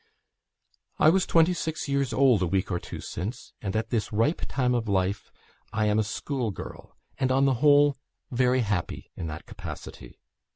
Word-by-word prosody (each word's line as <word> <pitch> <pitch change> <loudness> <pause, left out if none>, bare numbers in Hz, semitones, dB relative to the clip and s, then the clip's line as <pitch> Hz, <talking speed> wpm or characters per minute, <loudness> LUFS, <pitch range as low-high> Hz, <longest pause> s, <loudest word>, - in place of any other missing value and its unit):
"I 155 - +6
was 185 +3 +3
twenty 165 +2 +4
six 160 -3 -3
years 140 -2 0
old 125 -3 +4
a 90 - +2
week 95 +2 0
or 90 - 0
two - - -8
since; 110 +9 -6
and 100 -3 -3
at 110 +1 -1
this 115 -3 -1
ripe 115 +10 +1
time 125 -2 +1
of 115 -3 -1
life 95 +1 0 0.4
I 110 -1 0
am 105 0 +2
a - - +3
school 120 +3 -3
girl, 100 - -9 0.2
and, 130 -1 +1
on 135 +1 +4
the 135 - +4
whole, 145 -1 +5 0.3
very 125 +1 +3
happy 100 -6 -3
in 85 - -5
that 75 -1 -7
capacity. - - -9
120 Hz, 180 wpm, -27 LUFS, 105-140 Hz, 0.4 s, I